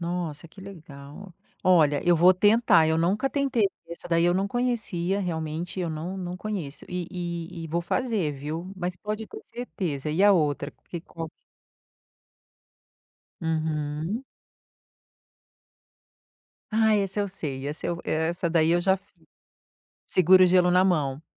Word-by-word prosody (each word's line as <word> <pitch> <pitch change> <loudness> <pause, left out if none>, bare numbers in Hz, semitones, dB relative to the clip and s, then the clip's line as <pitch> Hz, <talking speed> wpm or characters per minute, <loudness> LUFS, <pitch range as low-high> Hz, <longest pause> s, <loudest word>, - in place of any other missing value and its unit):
Nossa, 170 -3 -4
que 190 - -15
legal! 165 -1 -11 0.3
Olha, 155 -6 +4
eu 175 -1 +5
vou 180 +3 +6
tentar. 205 -4 +4
Eu 160 0 +2
nunca 200 +11 +1
tentei 275 -6 +1 0.2
essa 170 - -9
daí 170 0 +3
eu 175 - +4
não 195 +2 0
conhecia, 205 -6 -1
realmente 165 0 -4
eu 175 -2 -1
não 165 +5 -5
não 180 -1 -5
conheço. 185 -8 -5
E 180 -1 -3
e 170 -1 -5
e - - -5
vou 170 +2 0
fazer, 205 - -1
viu? 155 +6 -6
Mas 180 -1 -4
pode 215 +3 -4
ter 430 - -10
certeza. 160 - -4
E 165 +6 +1
a 205 - +7
outra, 150 -4 0 0.2
que 170 - -5
qual 165 0 -7 2.1
Uhum. 160 - -2 2.5
Ah, 220 0 +3
esse 195 0 -1
eu 200 - -1
sei. 140 -8 -5
Essa 150 +2 -4
eu 170 - -2
e - - -3
essa 170 +3 0
daí 165 -1 +3
eu 175 +1 +3
já 190 +2 +3
fiz. 195 +1 -26 0.8
Segura 185 +1 +5
o - - +7
gelo 180 0 +4
na 180 +1 +4
mão. 150 -6 0
175 Hz, 150 wpm, -26 LUFS, 160-195 Hz, 2.5 s, a